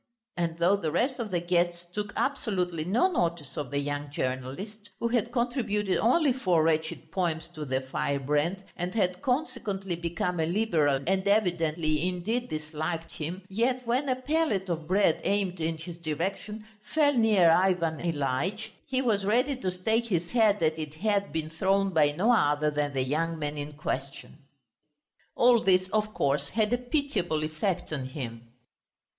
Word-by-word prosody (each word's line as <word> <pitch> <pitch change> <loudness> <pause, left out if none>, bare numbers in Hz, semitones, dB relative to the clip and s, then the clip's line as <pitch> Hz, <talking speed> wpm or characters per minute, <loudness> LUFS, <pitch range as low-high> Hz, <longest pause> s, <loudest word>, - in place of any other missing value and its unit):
And 170 -1 -2
though 175 +4 +3
the 165 -6 -2
rest 250 - 0
of 230 -3 -3
the 180 -3 0
guests 175 0 0
took 210 0 -3
absolutely 180 - -1
no 225 - +3
notice 170 - -1
of 145 -4 -4
the 140 - -2
young 145 0 -2
journalist, 140 - -4
who 235 - 0
had 235 -1 0
contributed 230 -5 0
only 265 +4 +3
four 180 -10 +2
wretched 160 0 -1
poems 170 -4 -1
to 155 -3 -5
the 130 -1 -1
Firebrand, 145 +7 -1
and 180 +3 -4
had 185 -4 0
consequently 240 - -1
become 175 +1 -2
a 160 - +1
Liberal 160 -8 +1
and 190 +2 +1
evidently, 170 -5 +1
indeed, 215 +8 -2
disliked 155 +1 -4
him, 170 +5 -5
yet 245 +5 0
when 255 +4 0
a 255 - +2
pellet 255 - 0
of 160 -2 -3
bread 185 -2 +3
aimed 195 -3 0
in 160 0 -1
his 165 +1 -9
direction 195 +7 -3 0.3
fell 295 -2 +5
near 215 -8 +5
Ivan 170 -2 +2
Ilyitch, 170 +7 -2 0.2
he 265 0 0
was 210 -5 +1
ready 245 +7 +2
to 190 -7 -2
stake 220 +6 0
his 175 -5 -1
head 220 -4 +4
that 160 0 +1
it 155 -1 -6
had 200 +2 0
been 160 -1 -3
thrown 195 +4 +1
by 150 -3 +4
no 190 +11 +2
other 150 -8 +3
than 145 -1 -1
the 130 -1 +1
young 165 +5 -1
man 150 -1 -3
in 145 0 -5
question. 140 0 -5 1.0
All 240 0 +5
this, 185 -1 +4
of 215 +1 0
course, 140 0 +1
had 220 +1 +1
a 245 - +2
pitiable 250 - -1
effect 160 +3 -2
on 135 -3 -3
him. 120 -4 -7
180 Hz, 165 wpm, -28 LUFS, 155-215 Hz, 1.0 s, fell